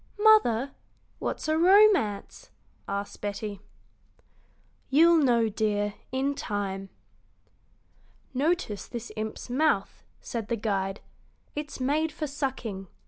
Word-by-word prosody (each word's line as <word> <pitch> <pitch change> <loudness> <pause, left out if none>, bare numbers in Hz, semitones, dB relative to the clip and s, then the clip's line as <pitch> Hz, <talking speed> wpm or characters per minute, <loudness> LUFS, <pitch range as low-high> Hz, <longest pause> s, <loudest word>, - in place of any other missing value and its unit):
"Mother, 280 - +5 0.5
what's - - -3
a 310 +1 +2
romance?" 375 - +4 0.4
asked 200 0 -4
Betty. 205 -1 -4 1.3
"You'll 330 +4 +6
know, 240 -5 +3
dear, 210 -1 0 0.2
in 270 +2 0
time." 195 -5 -4 1.4
"Notice 275 - 0
this 235 -1 -7
imp's 220 0 -5
mouth," 255 -6 +1 0.2
said 230 -3 -5
the 235 - 0
guide. 195 -2 -2 0.5
"It's 295 -1 -5
made 300 +5 +1
for 305 - -4
sucking. 260 -9 -4
235 Hz, 100 wpm, -27 LUFS, 205-300 Hz, 1.4 s, You'll